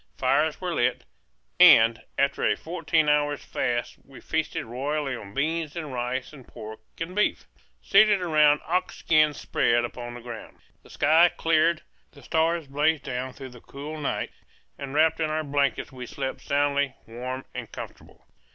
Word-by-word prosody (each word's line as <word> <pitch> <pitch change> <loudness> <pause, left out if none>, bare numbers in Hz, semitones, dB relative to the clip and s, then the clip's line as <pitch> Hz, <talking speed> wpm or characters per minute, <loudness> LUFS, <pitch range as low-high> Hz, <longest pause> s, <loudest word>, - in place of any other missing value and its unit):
Fires 145 +4 +1
were 180 -2 -3
lit, 120 - 0 0.6
and 115 0 +7 0.2
after 140 0 +1
a - - +2
fourteen 160 -2 0
hours' 145 -1 +1
fast 120 -1 -2
we 135 -1 -14
feasted 160 -1 -2
royally 135 +3 -2
on 100 -4 -10
beans 155 +2 -1
and 155 -5 -5
rice 125 +2 -3
and 135 -4 -14
pork 110 0 -9 0.2
and 165 +3 -5
beef, 210 - +1 0.4
seated 210 0 +5
around 150 -4 +4
ox 180 +2 -1
skins 155 -2 +2
spread 120 0 +1
upon 120 0 -7
the 120 - -9
ground. 115 -2 -9 0.2
The - - -19
sky 165 +3 +4
cleared; 165 -1 +1 0.3
the - - -16
stars 165 0 +1
blazed 150 +2 +1
down 130 0 -4
through 135 -2 -9
the 125 -1 -14
cool 150 +3 -8
night; 145 - -2 0.4
and 140 0 -7
wrapped 160 +1 +3
in 155 -1 0
our 155 0 -1
blankets 140 -1 -1
we 125 -2 -8
slept 135 +1 -5
soundly, 140 -1 0
warm 125 +3 -6
and - - -7
comfortable. - - -11
145 Hz, 160 wpm, -26 LUFS, 130-160 Hz, 0.6 s, and